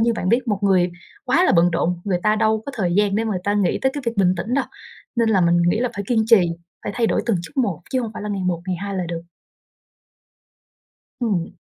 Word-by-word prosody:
như 230 +1 +3
bạn 185 -5 -3
biết 240 +3 +2
một 205 -2 +1
người 185 -3 +3 0.3
quá 315 +8 +3
là - - +3
bận 175 0 +4
rộn, 170 +1 -1
người 190 -3 0
ta 215 0 +3
đâu 220 0 +1
có 280 - -5
thời 180 -5 -1
gian 205 -1 +2
để 225 - 0
mà 220 - -1
người 180 - -4
ta 205 - +1
nghĩ 200 -4 +1
tới 265 - +2
cái 285 - -4
việc 230 - -1
bình 185 -2 +3
tĩnh 225 +8 -2
đâu, 275 - +1 0.5
nên 230 -1 +2
là 205 -4 +3
mình 170 0 +3
nghĩ 215 +6 +1
là 250 - +1
phải 200 - -4
kiên 225 -3 +2
trì, 225 -3 +7 0.4
phải - - -4
thay 235 -2 +2
đổi - - +1
từng 225 -5 +2
chút - - -10
một, 200 - 0
chứ 260 - +1
hông 225 -3 -4
phải - - -6
là 210 - -4
ngày 200 -2 -2
một, 175 -2 -1
ngày 185 -1 -1
hai 200 0 -4
là 180 - -1
được. 170 -1 -4 2.0
Ừm. 195 -8 0
205 Hz, 265 wpm, -21 LUFS, 180-230 Hz, 2.0 s, trì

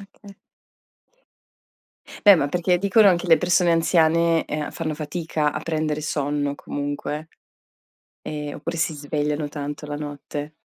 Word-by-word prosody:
okay. 200 0 -15 1.9
Beh, 205 - +10
ma 145 -5 +1
perché 180 +3 +1
dicono 200 +1 +5
che 175 - -5
le 165 -2 +6
persone 180 -1 +3
anziane 165 0 +3
ehm 150 0 -4
fanno 155 -2 -3
fatica 155 -1 -2
a - - -4
prendere 155 -2 -2
sonno 145 -1 -1
comunque, 145 +2 -5 0.9
e 150 -1 -5
oppure 170 0 -5
si 160 -1 0
svegliano 150 +1 -2
tanto 145 0 -6
la 145 0 -5
notte. 145 0 -6
155 Hz, 130 wpm, -23 LUFS, 145-170 Hz, 1.9 s, Beh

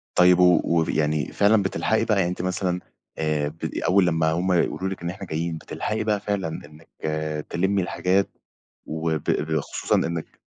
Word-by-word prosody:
طيب، 90 0 +6
و 90 -1 +6
وف 85 -1 +1
يعني 75 -1 0
فعلًا 105 +1 +4
بتلحقي 110 +3 0
بقى؟ 110 -2 +1
يعني 85 -2 +2
أنتِ 90 - -4
مثلًا 90 0 -1 0.4
آآ، 75 -2 0
بدي 80 +2 -5
أول 95 -1 +4
لمّا 80 -2 +2
هُم 90 +3 0
يقولوا 95 +2 +1
لِك 95 -2 -6
إن 85 - -2
إحنا 95 +1 -8
جايين، 80 0 -2
بتلحقي 110 +6 -3
بقى 105 -2 +1
فعلًا 100 -4 -2
إنِّك 80 0 -10 0.6
تلمّي 95 +2 +1
الحاجات 95 +2 +1 0.6
وب 80 -1 -2
ب 80 +1 +1
خصوصًا - - -2
إنِّك 85 -1 -3
90 Hz, 170 wpm, -24 LUFS, 80-95 Hz, 0.6 s, طيب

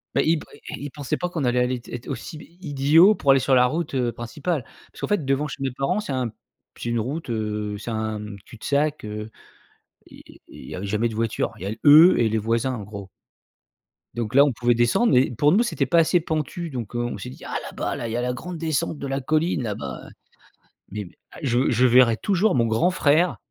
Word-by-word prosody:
Bah, - - +4
il 160 0 +2
p - - -11 0.3
i - - -4
il - - -4
pensait 145 -3 -3
pas 180 0 -2
qu'on 165 -5 -3
allait 125 0 +2
aller 125 0 0
t - - -13
être 120 0 -7
aussi 160 - -6
i 170 +1 -11
idiots 155 +9 +5
pour 140 - -2
aller 135 - +5
sur 135 - +1
la 125 0 +6
route, 160 +2 -3
heu, 125 -3 0
principale. 125 +6 -3 0.3
Parce - - -14
qu'en - - -2
fait, 205 -7 0
devant 135 +3 0
chez 135 - -8
mes 135 -2 -1
parents, 135 +10 -1
c'est 180 - -5
un 125 -4 -1 0.5
c'est 120 - -4
une 120 -1 0
route, 135 +5 -4
heu, 105 -2 -3
c'est 115 +3 -6
un 110 -1 -2 0.3
cul-de-sac, 145 +5 -1
heu, 105 +1 -6 0.8
i - - -14
i - - -17
il - - -12
y - - -6
avait 95 +2 -5
jamais 110 +4 0
de 110 - -7
voiture. 115 0 -1
Il 95 - -10
y - - -4
a 105 +2 -3
eux 155 +5 +8
et 115 -2 +3
les 110 - 0
voisins, 115 +4 0
en 105 - -6
gros. 100 -1 -9 1.1
Donc 115 -1 -3
là, 140 - +8
on 145 - +2
pouvait 120 +1 +1
descendre 120 - +2
mais 130 +1 +4
pour 145 +6 +3
nous, 220 +6 +4
c'était 155 - -1
pas 165 +6 +3
assez 170 +2 +3
pentu 160 +2 -3
donc 120 -2 -6
heu, - - 0
on 120 - -3
s'est 125 - -7
dit: - - -12
«Ah, - - -5
là-bas - - -4
là, 120 - -4
il - - -5
y 120 - -2
a - - 0
la 125 0 -1
grande 175 +7 -7
descente 160 0 -1
de 140 - -5
la 135 0 -2
colline 155 0 0
là-bas», 70 - -5 0.9
mais 105 -1 -5
b 85 - -14 0.3
je 125 0 +2
je 125 +2 +3
verrai 120 -2 +5
toujours 200 -2 +1
mon 115 -2 +3
grand 115 +11 +2
frère 170 0 +2
130 Hz, 245 wpm, -23 LUFS, 115-155 Hz, 1.1 s, eux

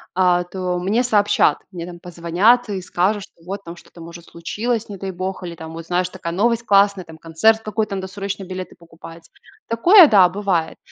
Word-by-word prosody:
а, 180 -1 +3
то 180 0 -4
мне 205 +7 0
сообщат. 210 -4 +2
Мне 170 -2 -7
там 175 -1 -10
позвонят 180 +8 +1
и 195 -2 -3
скажут, 190 +3 -1
что 165 - -19
вот 195 +3 -7
там 170 -1 -9
что-то, 175 0 -16
может, 170 +1 -11
случилось, 220 +7 -4
не 200 - -7
дай 190 0 -5
бог, 185 +1 -5
или 175 -1 -6
там, 160 -1 -10
вот 165 0 -8
знаешь, 180 +1 -1
такая 170 -3 -6
новость 230 +4 +1
классная, 200 -2 +3
там 160 -1 -14
концерт 165 +8 +2
какой-то, 215 -1 -3
надо 190 -1 -5
срочно 195 +1 -6
билеты 185 0 -7
покупать. 165 0 -14 0.4
Такое- 340 - +7
да, 195 -7 +6
бывает. 180 -3 -2
185 Hz, 190 wpm, -20 LUFS, 170-205 Hz, 0.4 s, Такое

